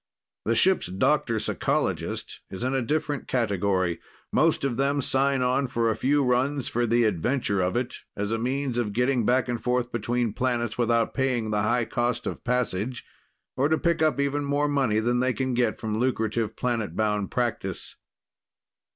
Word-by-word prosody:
The 115 +3 +2
ship's 185 - +4
doctor 115 +6 +1
psychologist 110 - -2
is 95 - -6
in 130 +1 0
a 135 - +1
different 145 +2 -2
category. 100 -6 0 0.3
Most - - +2
of 135 -4 0
them 140 +2 +1
sign 135 0 +1
on 130 +2 +1
for 115 -1 +1
a - - -1
few 145 +2 +2
runs 130 +2 +1
for 120 0 0
the 120 +1 +3
adventure 105 - 0
of 90 +3 0
it, 125 +1 -2 0.2
as 105 +1 -2
a 115 - 0
means 130 +1 -1
of 105 -4 -1
getting 125 0 +1
back 125 +1 +3
and 120 -1 -2
forth 125 0 0
between 120 0 -1
planets 120 -2 -1
without 115 -1 +1
paying 125 -5 0
the 105 -1 +1
high 120 +3 +1
cost 120 +2 -1
of - - -5
passage 125 -1 -1 0.5
or 140 +3 +2
to 160 - +3
pick 170 -1 0
up 155 -2 +2
even 140 +1 0
more 145 +1 +1
money 135 -7 +1
than 120 +2 +1
they 130 0 +1
can 130 0 -1
get 120 -2 +1
from 110 -1 -2
lucrative 115 -3 0
planetbound 105 -3 -1
practice. 115 -7 -3
120 Hz, 175 wpm, -26 LUFS, 110-130 Hz, 0.5 s, ship's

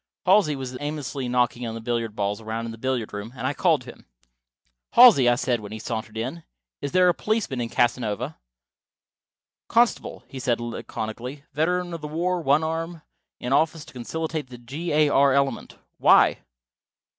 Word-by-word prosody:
Halsey 180 -6 +4
was 130 -2 -6
aimlessly 145 -3 -4
knocking 125 -1 0
the - - -5
billiard 115 -2 -2
balls 100 +1 -2
around 110 +1 -4
in 115 - -5
the 115 - -10
billiard 125 -4 -2
room, 105 +2 -6
and 125 -1 -5
I 135 - +1
called 160 -5 +2
to 125 -1 -9
him. - - -21 0.9
"Halsey," 220 - +8
I 120 - +4
said 125 -2 0
when 105 -1 -9
he 110 - -5
sauntered 110 -1 -5
in, 130 +9 -4 0.4
"is 140 - -3
there 185 0 +4
a 175 - +5
policeman 165 - -1
in 115 - -3
Casanova?" 120 +3 -1 1.3
"Constable," 235 +1 +1
he 135 - -8
said 120 -2 0
laconically. 120 +3 -6
"Veteran 175 +4 0
of 165 - -6
the 150 - -5
war, 175 +3 -1
one 145 +1 +3
arm; 165 0 -3 0.4
in 125 +2 -2
office 155 +1 +1
to - - -15
conciliate 155 +3 -4
the 125 - -10
G. 140 +9 -5
A. 150 0 +4
R. 140 -1 +4
element. 140 0 -1 0.2
Why?" - - +5
135 Hz, 175 wpm, -24 LUFS, 120-160 Hz, 1.3 s, Halsey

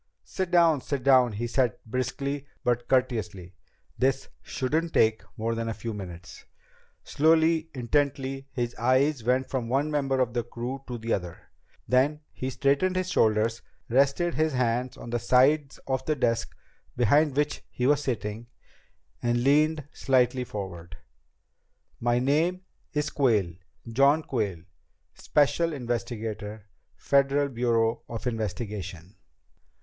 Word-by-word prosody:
"Sit 185 -2 -3
down, 170 -5 +4
sit 140 -2 -3
down," 130 -4 +5
he 110 +4 -3
said 120 -1 +1
briskly 135 +4 -3 0.2
but 120 0 0
courteously. 110 -8 -1 0.5
"This 135 +1 +1
shouldn't 160 +6 -2
take 110 0 +3 0.2
more 115 +1 -1
than 115 0 -3
a 115 - -3
few 115 -1 -5
minutes." 90 -3 -9 0.6
Slowly, 160 +1 +3
intently, 135 +1 -1
his 120 -2 -2
eyes 130 +2 +2
went 130 +3 +1
from 125 -4 -3
one 140 +4 +1
member 135 -3 0
of 125 -3 +1
the 120 - 0
crew 120 +3 -6
to 125 -1 -4
the 115 0 -2
other. 90 -3 -5 0.4
Then 140 +4 +2
he 130 - -4
straightened 140 +8 +1
his 185 0 -1
shoulders, 110 -3 +2 0.3
rested 140 +7 +2
his 155 -1 +1
hands 125 0 0
on 120 - -8
the 120 - 0
sides 135 +4 +3
of 130 -1 -1
the 155 - +2
desk 115 -4 -1 0.4
behind 140 +4 +3
which 150 0 0
he 125 - -3
was 145 +1 +3
sitting, 115 -3 -3 0.7
and 120 0 +1
leaned 150 +3 +3
slightly 130 -1 +2
forward. 85 -7 -7 1.0
"My 120 0 +1
name's 150 +3 -1
Quayle. 110 - +2 0.3
John 140 +7 +3
Quayle. 105 - -2 0.5
Special 150 +3 +1
Investigator, 110 -5 -4 0.3
Federal 140 +1 +2
Bureau 115 -2 +1
of 115 0 -6
Investigation." 105 -6 -4
125 Hz, 130 wpm, -27 LUFS, 115-140 Hz, 1.0 s, down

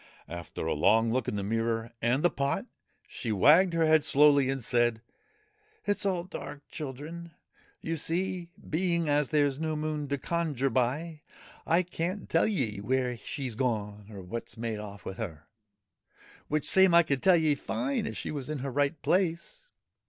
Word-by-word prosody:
After 85 -1 -6
a 80 - +1
long 115 +9 +3
look 130 -2 0
in - - -1
the 100 - -2
mirror 115 +2 -1
and 125 +6 +1
the 175 - +4
pot, 140 -1 -1 0.4
she 115 - -4
wagged 160 - +5
her 165 -1 +3
head 155 -1 +5
slowly 140 -2 +5
and 135 -2 -2
said, 120 -1 +1 0.4
' 430 +1 -37
It 205 - +1
's - - 0
all 180 -3 0
dark, 150 -5 -8
children. 160 +4 -7 0.5
You 165 - -2
see, 175 +2 -2 0.2
being 170 0 0
as 145 -1 +2
there's 145 -2 +2
no 160 -1 -1
Moon 150 -1 -2
to 140 +1 -1
conjure 145 -4 -1
by, 150 +6 -1 0.5
I 170 +3 +4
can't 180 +3 -4
tell 165 - +3
ye 125 - -1
where 125 +2 0
she 130 +3 -5
's 120 - -5
gone 105 -4 -2
or 100 -3 -8
what 115 +6 -6
's - - -10
made 115 -2 -3
off 100 -2 -9
with 95 - -6
her 80 -9 -6 1.0
which 155 0 -1
same 190 -2 +5
I 170 - +8
could 140 -4 -1
tell 185 -2 +6
ye 155 -2 +3
fine 135 0 -2
if 110 - -5
she - - -4
was 145 -2 -5
in 155 - -2
her 135 - -3
right 145 +3 0
place. 190 - 0
145 Hz, 185 wpm, -29 LUFS, 115-170 Hz, 1.0 s, I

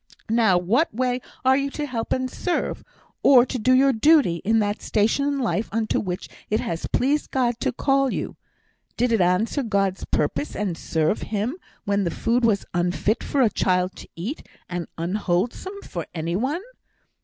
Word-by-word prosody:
Now 220 -5 +4
what 225 - +2
way 250 +2 -1 0.2
are 260 0 +6
you 280 +1 0
to 295 +1 -4
help 235 -5 -4
and 255 0 +1
serve, 350 +7 -2 0.4
or 250 -3 +7
to 255 - -4
do 255 +4 +2
your 270 +1 +5
duty, 265 - +4
in 225 +6 +1
that 205 -1 0
station 220 +6 +1
of 280 - -2
life 230 -3 -1
unto 220 +1 0
which 185 -1 -4 0.2
it 215 - +1
has 165 0 -3
pleased 290 +4 +1
God 240 -3 0
to - - 0
call 270 +1 +1
you? - - -4 0.6
Did 245 0 +2
it 225 -4 +3
answer 180 +10 +2
God's 195 -5 0
purpose, 145 0 -1
and 195 -4 -2
serve 160 +3 0
Him, 215 +6 -2 0.3
when 200 0 +1
the 175 - 0
food 240 +7 0
was 215 -4 +2
unfit 180 +5 0
for 280 - 0
a 230 - +4
child 185 -1 +1
to - - -11
eat, 210 - -5 0.2
and 175 -1 -4
unwholesome 205 - -2
for 170 -2 -6
any 165 +1 -2
one?' 275 - -1
225 Hz, 180 wpm, -24 LUFS, 185-260 Hz, 0.6 s, or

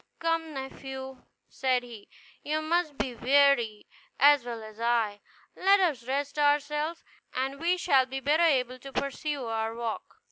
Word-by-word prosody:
"Come, 330 -2 -1
nephew," 265 -1 -7 0.2
said 255 -2 0
he, 230 -4 -12 0.3
"you 305 +1 -1
must 320 -2 0
be 255 - -2
weary, 250 -4 +3 0.3
as 285 -2 +6
well 235 -2 -6
as 215 0 -12
I; 230 -3 0 0.3
let 395 +2 +4
us 290 -11 0
rest 285 +2 -2
ourselves, 295 +3 +1 0.3
and 270 +2 -2
we 345 +3 +1
shall 270 -7 +3
be 265 +1 -4
better 295 +5 +2
able 255 -6 +2
to 275 +2 -10
pursue 280 0 -3
our 225 0 -2
walk." 235 -1 -5
270 Hz, 150 wpm, -28 LUFS, 240-300 Hz, 0.3 s, as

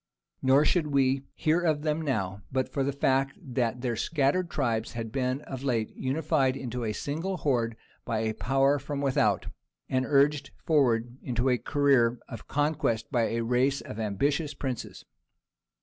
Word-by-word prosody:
Nor 135 +3 +5
should 165 -2 +2
we 135 -2 +2
hear 160 +3 +2
of 155 -4 +1
them 155 0 0
now, 100 -10 -2
but 130 0 0
for 140 - +1
the 140 - 0
fact 135 -1 +1
that 125 -2 -2
their 120 -2 -1
scattered 155 +7 +1
tribes 115 -7 -1
had 115 -2 -5
been 130 +1 -1
of 130 -3 -7
late 120 -5 -1
unified 135 -1 +1
into 125 -2 -4
a 110 - -1
single 165 - -3
horde 120 -7 0 0.3
by 110 -1 -1
a 110 0 -1
power 135 +5 +2
from 140 +1 -4
without, 140 -2 +2 0.4
and 130 0 0
urged 140 0 +3 0.2
forward 125 -5 +2
into 125 +1 0
a 125 -1 +2
career 135 -5 +3
of 115 - -9
conquest 145 -6 0
by 120 -4 +2
a 115 0 -1
race 125 +4 +1
of 110 - -8
ambitious 140 +8 0
princes. 130 -4 -5
135 Hz, 165 wpm, -28 LUFS, 120-145 Hz, 0.4 s, Nor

